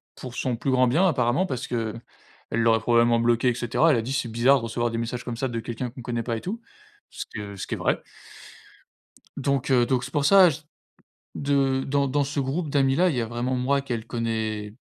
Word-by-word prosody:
pour 125 Hz, -2 st, -9 dB
son 125 Hz, -1 st, -1 dB
plus 135 Hz, -, -2 dB
grand 130 Hz, 0 st, +4 dB
bien 170 Hz, +10 st, +3 dB
apparemment 130 Hz, +2 st, +1 dB
parce 130 Hz, -7 st, -4 dB
qu'elle 115 Hz, -1 st, -3 dB, 0.5 s
l'aurait 115 Hz, 0 st, +3 dB
probablement 120 Hz, 0 st, +3 dB
bloqué 120 Hz, +1 st, +2 dB
et -, -, +1 dB
cetera. 125 Hz, +8 st, +2 dB
Elle 135 Hz, -, +3 dB
a -, -, 0 dB
dit 130 Hz, +4 st, -4 dB
c'est 140 Hz, -3 st, -1 dB
bizarre 120 Hz, +5 st, +4 dB
de -, -, -9 dB
recevoir 120 Hz, +1 st, -1 dB
des 115 Hz, -, -3 dB
messages 120 Hz, +1 st, -4 dB
comme 120 Hz, -2 st, -4 dB
ça 130 Hz, -, -1 dB
de 115 Hz, -1 st, -3 dB
quelqu'un 120 Hz, +2 st, -4 dB
qu'on 125 Hz, -, -10 dB
connaît 120 Hz, -1 st, -2 dB
pas 115 Hz, 0 st, -2 dB
et -, -, -7 dB
tout. 220 Hz, +6 st, -5 dB, 0.5 s
Ce -, -, -6 dB
que 100 Hz, -1 st, -6 dB
ce -, -, -5 dB
qui -, -, -2 dB
est -, -, -8 dB
vrai -, -, 0 dB, 1.3 s
donc, 140 Hz, 0 st, -1 dB
heu, 125 Hz, -2 st, +4 dB
donc 125 Hz, 0 st, 0 dB
c'est 130 Hz, -, -7 dB
pour 145 Hz, -1 st, 0 dB
ça 190 Hz, +3 st, +7 dB
j 160 Hz, 0 st, -5 dB, 0.8 s
de 135 Hz, -2 st, +1 dB
dans 140 Hz, 0 st, +1 dB
dans 145 Hz, +2 st, +1 dB
ce 145 Hz, +1 st, -4 dB
groupe 145 Hz, +4 st, -2 dB
d'amis 135 Hz, -1 st, +2 dB
là, 185 Hz, +3 st, +4 dB
il 145 Hz, -, -3 dB
y -, -, +1 dB
a 115 Hz, -, -2 dB
vraiment 120 Hz, +3 st, -2 dB
moi 135 Hz, +3 st, +1 dB
qu'elle 120 Hz, -5 st, -4 dB
connais 110 Hz, -3 st, -3 dB
125 Hz, 235 wpm, -25 LUFS, 115-140 Hz, 1.3 s, ça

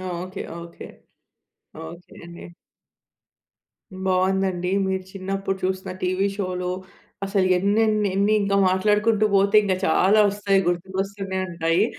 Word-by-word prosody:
Okay, 185 Hz, +2 st, -6 dB, 0.2 s
okay, 170 Hz, 0 st, -10 dB, 1.0 s
okay 170 Hz, +2 st, -12 dB
అండి. 170 Hz, 0 st, -11 dB, 1.6 s
బావుందండి. 185 Hz, -1 st, 0 dB, 0.2 s
మీరు 190 Hz, 0 st, -2 dB
చిన్నప్పుడు 195 Hz, 0 st, -3 dB
చూసిన 190 Hz, 0 st, -3 dB
టీవీ 185 Hz, +2 st, +1 dB
షోలు 180 Hz, -2 st, -3 dB, 0.5 s
అసలు 195 Hz, -1 st, +1 dB
ఎన్నెన్నెన్ని 205 Hz, 0 st, +2 dB
ఇంకా 200 Hz, 0 st, 0 dB
మాట్లాడుకుంటూ 210 Hz, +3 st, +2 dB
పోతే 200 Hz, +2 st, +3 dB
ఇంకా 195 Hz, -2 st, +1 dB
చాలా 200 Hz, +2 st, +4 dB
వస్తాయి 200 Hz, -1 st, +1 dB
గుర్తుకొస్తూనే 190 Hz, +2 st, -3 dB
ఉంటాయి. 170 Hz, +3 st, +1 dB
190 Hz, 100 wpm, -23 LUFS, 185-200 Hz, 1.6 s, చాలా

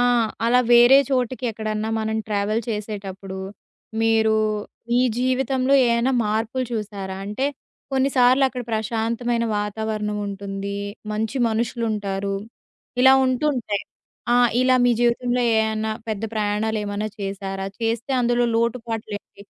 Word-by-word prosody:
ఆ! -, -, +4 dB, 0.4 s
అలా 250 Hz, +1 st, +5 dB
వేరే 240 Hz, +3 st, +8 dB
చోటికి 255 Hz, 0 st, -1 dB
ఎక్కడన్నా 215 Hz, 0 st, -3 dB
మనం 220 Hz, 0 st, -1 dB
ట్రావెల్ 210 Hz, +2 st, 0 dB
చేసేటప్పుడూ, 195 Hz, -3 st, -5 dB, 0.6 s
మీరూ, 220 Hz, -1 st, +3 dB, 0.5 s
మీ 245 Hz, -, +4 dB, 0.2 s
జీవితంలో 260 Hz, +1 st, +1 dB
ఏయైనా 235 Hz, +3 st, +2 dB
మార్పులు 225 Hz, +4 st, -1 dB
చూసారా? 200 Hz, -3 st, -4 dB
అంటే, 235 Hz, +7 st, -1 dB, 0.5 s
కొన్నిసార్లక్కడ 260 Hz, -1 st, +3 dB
ప్రశాంతమైన 230 Hz, +2 st, -1 dB
వాతావరణం 210 Hz, 0 st, -2 dB
ఉంటుందీ, 200 Hz, 0 st, -5 dB, 0.3 s
మంచి 220 Hz, +4 st, -2 dB
మనుషులుంటారు, 215 Hz, -4 st, -2 dB, 0.7 s
ఇలా 265 Hz, 0 st, +8 dB
ఉంటుంటాయి. 255 Hz, -6 st, 0 dB, 0.5 s
ఆ! -, -, +5 dB, 0.3 s
ఇలా 255 Hz, 0 st, +4 dB
మీ 245 Hz, -, +4 dB
జీవితంలో 245 Hz, +1 st, +1 dB, 0.2 s
ఏయన్నా, 220 Hz, 0 st, 0 dB, 0.2 s
పెద్ద 215 Hz, -1 st, -3 dB
ప్రయాణాలేమన్నా 210 Hz, 0 st, -1 dB
చేశారా? 195 Hz, 0 st, -4 dB
చేస్తే 230 Hz, +3 st, -1 dB
అందులో 240 Hz, 0 st, +2 dB
లోటుపాట్లేంటి? 225 Hz, -4 st, -3 dB
220 Hz, 105 wpm, -23 LUFS, 210-245 Hz, 0.7 s, వేరే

